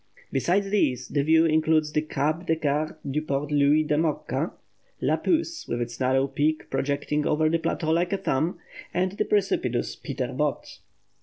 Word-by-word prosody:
Besides 190 +9 +1
these, 130 - +1
the 145 - +1
view 160 +3 +4
includes 155 -1 +2
the 150 - +1
Caps 155 +3 -2
de 160 - +3
Garde 155 0 -1
du 145 +3 -1
Port 145 -1 -2
Louis 145 +1 +4
de 150 0 +1
Mocca, 155 -1 -1 0.5
Le - - +2
Pouce, 330 0 -1
with 120 - -2
its 120 0 -4
narrow 130 +1 +2
peak 150 +3 -1
projecting 145 +1 -1
over 155 +1 +2
the 165 +1 +1
plateau 160 0 -1
like 175 +2 +1
a 195 - +1
thumb, 160 +2 -1 0.4
and 185 +1 +1
the 200 - -1
precipitous 200 -2 0
Peter - - -4
Botte. - - -2
155 Hz, 170 wpm, -26 LUFS, 140-165 Hz, 0.5 s, view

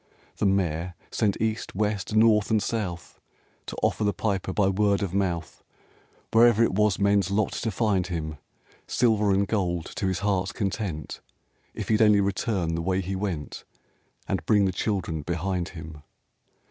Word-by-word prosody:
The 105 - +2
Mayor 90 -3 0 0.2
sent 100 -3 0
East, 110 -2 -2
West, 105 0 -1
North 110 -1 +4
and 110 -1 +3
South, 100 -7 -4 0.5
To - - -5
offer - - +1
the 100 -1 +1
Piper, 95 -3 -1
by 95 +1 +2
word 100 +1 +2
of 95 -3 -3
mouth, 90 -4 -2 0.7
Wherever 115 0 +6
it 115 - +1
was 105 0 +2
men's 100 -2 +2
lot 100 +1 +1
to 115 - -2
find 100 -4 0
him, 80 -4 -4 0.5
Silver 110 -4 +2
and 100 +1 +2
gold 90 -6 -1
to 95 - 0
his 95 0 -1
heart's 100 +1 0
content, 95 -7 -3 0.5
If - - -5
he'd 110 0 +3
only 105 -2 +6
return 95 -3 0
the 85 - -1
way 95 +2 0
he 95 +1 -4
went, 95 -6 -4 0.6
And - - -1
bring 105 -2 +4
the 95 - +1
children 90 -5 -2
behind 90 +3 -2
him. 80 -2 -9
100 Hz, 160 wpm, -26 LUFS, 90-105 Hz, 0.7 s, Wherever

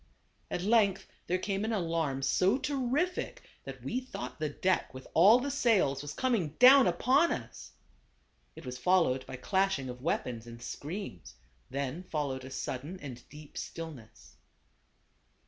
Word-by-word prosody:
At 175 - -3
length 205 -2 +3 0.2
there 180 - +1
came 195 +1 -2
an 220 - -1
alarm 165 -9 -1
so 185 - +3
terrific 285 +5 -1 0.2
that - - -8
we 250 - -1
thought 255 -9 -7
the 155 -1 -1
deck 185 +5 0
with 130 - -9
all 200 +8 +7
the 275 +3 -2
sails 200 - +2
was 145 0 -6
coming 220 - 0
down 260 -1 +8
upon 255 - +3
us. - - -6 0.8
It - - -11
was 125 0 -6
followed 165 -8 +3
by 130 - -6
clashing 190 -1 0
of 125 0 -8
weapons 120 -6 -2
and 115 0 -10
screams; 120 - -7 0.3
then 140 +5 -3
followed 145 -7 -3
a 130 - -8
sudden 135 +6 -5
and 130 -6 -8
deep 150 0 -10
stillness. 155 -10 -9
170 Hz, 145 wpm, -31 LUFS, 135-215 Hz, 0.8 s, down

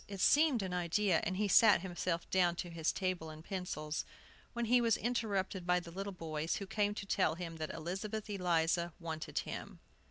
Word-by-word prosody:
It 200 -1 -7
seemed 285 - +4
an 185 -1 -3
idea; 180 +1 +2
and 185 - -1
he 210 +1 +1
sat 205 -2 +6
himself 175 -2 -2
down 175 -2 +3
to 175 0 -5
his 165 -1 0
table 185 -4 -2
and 155 +1 -10
pencils, 160 -5 -3 0.5
when 235 0 -1
he 245 +2 +4
was 230 -2 +3
interrupted 200 -6 -1
by 180 0 +4
the 170 -1 -10
little 195 +3 -4
boys, 160 -3 -3
who 200 - -4
came 205 +1 0
to 200 - -5
tell 185 -5 +2
him 165 -1 -6
that 155 -1 -4
Elizabeth 200 +6 -4
Eliza 175 -3 +1
wanted 160 -2 -5
him. - - -4
180 Hz, 190 wpm, -35 LUFS, 170-205 Hz, 0.5 s, sat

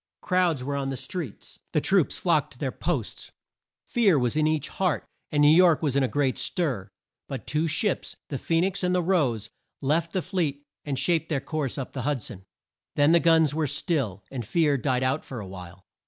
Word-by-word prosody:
Crowds 180 -7 +1
were 140 +2 -2
on 135 -1 -2
the 135 - -3
streets. 180 - -7
The - - +3
troops - - +2
flocked - - +1
to - - -16
their - - -2
posts. - - -3 0.5
Fear 210 - +3
was 125 -1 +1
in 155 0 +3
each 155 -2 0
heart, 185 -5 -1 0.3
and 150 - +2
New 150 +2 +7
York 170 -3 +5
was 140 -4 +1
in 140 - +3
a 130 - +2
great 135 -1 0
stir. 125 - -1 0.4
But 135 -2 -6
two 155 +2 0
ships 165 +6 -1
the 140 - -3
Phoe 165 0 +1
nix 195 +2 0
and 180 0 +2
the 180 - +1
Rose 145 - +1 0.3
left 160 +4 0
the 185 - 0
fleet 150 -7 -2 0.2
and 140 -3 -3
shaped 165 +2 +1
their 150 -4 +1
course 150 -2 -3
up 135 - -5
the 130 - -3
Hud 140 -3 -1
son. 95 0 -7 0.5
Then 145 +2 +4
the 170 - +6
guns 160 -3 +4
were 155 -1 0
still, 135 - -1
and 130 -3 -4
fear 150 - +2
died 130 -1 0
out 130 +4 0
for 130 - -7
a 105 - -6
while. 95 0 -10
145 Hz, 210 wpm, -26 LUFS, 130-165 Hz, 0.5 s, New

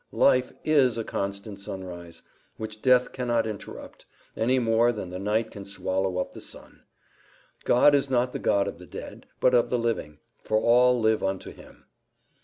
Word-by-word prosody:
Life 125 0 +3
IS 135 -7 +3
a 115 - -2
constant 100 0 -5
sunrise, 90 -3 -8 0.3
which 110 -1 -7
death 125 -1 +4
cannot 120 -2 0
interrupt, 105 -2 -8 0.3
any 125 +4 +2
more 115 0 +3
than 105 -6 -6
the 90 - -5
night 110 +3 0
can 100 - -8
swallow 95 -1 -2
up 90 - -3
the - - -10
sun. - - -11 0.8
"God 135 +4 +5
is 140 -1 +2
not 125 -1 +1
the - - -3
God 100 -1 +2
of - - -6
the - - -12
dead, - - -9
but 125 - +3
of 120 -1 +3
the 125 - +1
living; 115 -11 -2 0.3
for 110 - +1
all 125 +2 +4
live 110 -1 +2
unto 95 0 -3
him." - - -16
110 Hz, 175 wpm, -26 LUFS, 100-125 Hz, 0.8 s, God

